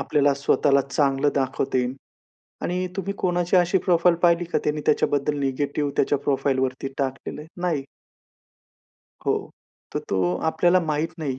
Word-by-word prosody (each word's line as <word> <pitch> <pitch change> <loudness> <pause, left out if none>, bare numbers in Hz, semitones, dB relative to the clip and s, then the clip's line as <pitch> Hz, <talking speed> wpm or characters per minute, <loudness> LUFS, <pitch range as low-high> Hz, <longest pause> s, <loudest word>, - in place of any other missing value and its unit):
आपल्याला 145 -2 +2
स्वतःला 140 0 +3
चांगलं 140 0 +2
दाखवता 130 -1 0
येईल 125 +1 -1 0.7
आणि 180 +1 -1
तुम्ही 200 +1 -2
कोणाची 175 0 +1
अशी 175 +2 +3
प्रोफाइल 175 -1 +4
पाहिली 170 0 +4
का, 175 - -1
त्यांनी 150 0 -1
त्याच्याबद्दल 145 +1 +1
नेगेटिव्ह 140 +1 -1
त्याच्या 145 +1 +2
प्रोफाइलवरती 135 -1 -1
टाकलेलं 135 +2 -3
आहे? 155 - -12
नाही. 165 -6 0 1.4
हो, - - +3 0.6
तर - - +1
तो 90 -2 +1
आपल्याला 175 +2 +3
माहीत 155 0 -1
नाही, 135 -4 -3
145 Hz, 135 wpm, -24 LUFS, 135-170 Hz, 1.4 s, प्रोफाइल